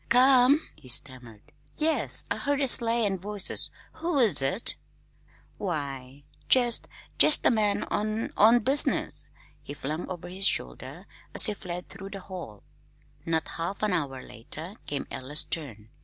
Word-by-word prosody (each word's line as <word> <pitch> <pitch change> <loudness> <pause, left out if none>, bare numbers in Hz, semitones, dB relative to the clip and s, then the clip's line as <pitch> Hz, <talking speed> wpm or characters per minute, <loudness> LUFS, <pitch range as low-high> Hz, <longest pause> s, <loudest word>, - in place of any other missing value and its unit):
"C 240 - +4
ome?" 260 +3 +5
he 130 - -16
stammered. 120 -4 0 0.3
"Yes, 315 +1 +4
I - - -1
heard 285 0 -2
a 275 - 0
sleigh 235 -2 +1
and 195 -3 -3
voices. 205 -1 -1 0.3
Who 330 -1 -2
is 210 - +4
it?" 140 +12 +2 0.8
"Why, 140 -6 -6 0.3
jest 240 -3 +3 0.3
jest 305 - +7
a - - +5
man 210 -3 0
on 215 +2 -3
on 230 +3 +5
business," 270 +6 +2 0.4
he 145 - -9
flung 155 +5 -6
over 175 -2 -7
his 190 +2 +1
shoulder, - - -1 0.3
as - - +4
he 215 - +5
fled 180 -2 -7
through 195 0 -10
the 200 - -8
hall. 175 - -10 0.6
Not 160 -1 -1
half 190 +5 -4
an 210 -3 0
hour 135 -6 -3
later 150 - -8
came 145 -1 -4
Ella's 145 +4 -1
turn. 110 -10 -6
190 Hz, 155 wpm, -26 LUFS, 145-230 Hz, 0.8 s, jest